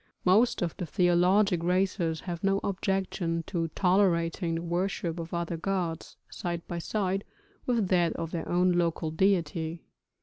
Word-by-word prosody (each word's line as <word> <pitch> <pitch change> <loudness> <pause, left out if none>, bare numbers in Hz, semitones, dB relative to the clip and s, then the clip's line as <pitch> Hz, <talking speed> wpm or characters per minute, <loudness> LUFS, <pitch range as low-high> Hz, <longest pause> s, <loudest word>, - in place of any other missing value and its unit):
Most 205 +3 +4
of 170 - -2
the 180 - -4
theologic 180 +2 +3
races 180 -2 0
have 175 -1 -5
no 195 0 +2
objection 190 -3 -1
to 170 -3 -2
tolerating 175 -3 +2
the 165 - -2
worship 175 -1 -2
of 165 0 -6
other 170 -1 -2
gods 175 -2 -3
side 170 -1 -5
by 175 - -4
side 195 +1 -1 0.4
with 230 -6 +1
that 175 -2 +3
of 165 -1 -5
their 170 - -4
own 180 +1 +3
local 170 -2 0
deity. 165 -2 0
175 Hz, 145 wpm, -28 LUFS, 165-190 Hz, 0.4 s, Most